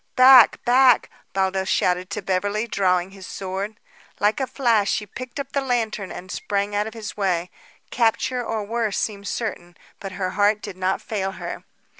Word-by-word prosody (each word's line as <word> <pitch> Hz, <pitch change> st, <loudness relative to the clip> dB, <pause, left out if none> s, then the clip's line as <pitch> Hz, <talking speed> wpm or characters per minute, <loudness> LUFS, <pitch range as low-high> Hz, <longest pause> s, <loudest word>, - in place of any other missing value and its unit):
"Back! 255 Hz, -2 st, +7 dB
Back!" 250 Hz, 0 st, +5 dB, 0.2 s
Baldos 190 Hz, 0 st, 0 dB
shouted 180 Hz, +1 st, +1 dB
to 200 Hz, 0 st, -4 dB
Beverly, 200 Hz, +4 st, 0 dB
drawing 185 Hz, -4 st, +1 dB
his 195 Hz, -1 st, -11 dB
sword. 195 Hz, +3 st, -5 dB, 0.4 s
Like 210 Hz, +4 st, +2 dB
a 265 Hz, -, -1 dB
flash, 230 Hz, -7 st, +2 dB
she 210 Hz, -, 0 dB
picked 255 Hz, +6 st, -8 dB
up 275 Hz, -1 st, -5 dB
the 280 Hz, -, 0 dB
lantern 225 Hz, -6 st, -2 dB
and 185 Hz, +1 st, -8 dB
sprang 200 Hz, 0 st, -2 dB
out 210 Hz, +1 st, 0 dB
of 220 Hz, -, -9 dB
his 215 Hz, -2 st, -6 dB
way. 180 Hz, -3 st, -1 dB, 0.4 s
Capture 245 Hz, +2 st, +1 dB
or 225 Hz, -2 st, -2 dB
worse 225 Hz, 0 st, -1 dB
seemed 200 Hz, -2 st, -3 dB
certain; 175 Hz, -7 st, -4 dB, 0.2 s
but 195 Hz, -1 st, -7 dB
her 185 Hz, -1 st, -2 dB
heart 205 Hz, +2 st, +2 dB
did -, -, -6 dB
not 185 Hz, +1 st, -1 dB
fail 195 Hz, -3 st, -3 dB
her. -, -, -7 dB
205 Hz, 175 wpm, -23 LUFS, 190-230 Hz, 0.4 s, Back